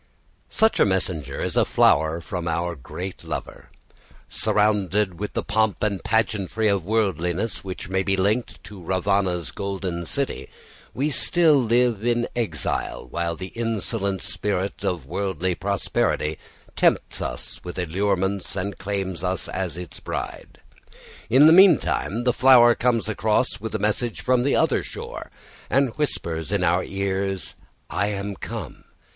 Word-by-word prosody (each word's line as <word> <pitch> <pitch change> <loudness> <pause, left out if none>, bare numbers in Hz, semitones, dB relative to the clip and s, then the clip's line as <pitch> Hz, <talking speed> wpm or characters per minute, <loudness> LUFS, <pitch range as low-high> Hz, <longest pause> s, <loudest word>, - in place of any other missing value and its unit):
Such 220 0 +3
a - - +6
messenger 85 -8 -2
is - - -2
a - - +5
flower 80 +3 +3
from 90 0 -4
our 85 +1 -1
great 90 +7 -7
lover. - - -6 0.6
Surrounded 105 -3 +1
with 105 - -4
the - - -1
pomp 110 -2 0
and 100 -3 -1
pageantry 110 -1 0
of 100 -4 +1
worldliness, 95 -1 -1
which 95 -3 -6
may 95 +1 0
be 95 0 0
linked 105 +6 0
to 100 -2 -10
Ravana's 90 -3 0
golden 95 -4 -4
city, 140 -1 -2 0.5
we 145 +4 0
still 165 +2 +4
live 120 -4 +2
in 120 0 +1
exile, 110 -10 -2
while 85 -1 -1
the 95 +2 -7
insolent 110 -3 -1
spirit 100 -1 -3
of 85 -7 -2
worldly 95 +2 -2
prosperity 90 -5 -1 0.4
tempts - - +1
us - - -5
with 90 0 -7
allurements 95 +2 -1
and 100 +1 -4
claims 95 -3 -3
us 95 -1 -1
as 90 -3 -3
its 90 -1 -7
bride. - - -6 0.7
In 130 +6 +7
the 160 - +8
meantime 165 - +4
the 125 -1 +2
flower 125 -2 +7
comes 115 -3 +1
across 105 -1 0
with 110 -1 -4
a - - +2
message 105 +3 -1
from 125 -1 +2
the 140 +3 +2
other - - +2
shore, - - -8 0.4
and 135 -3 +2
whispers 85 - -2
in 100 -3 +1
our 90 +1 +2
ears, 95 -1 -2 0.3
"I 100 - 0
am 100 -1 -3
come. - - -7
100 Hz, 145 wpm, -24 LUFS, 90-110 Hz, 0.7 s, the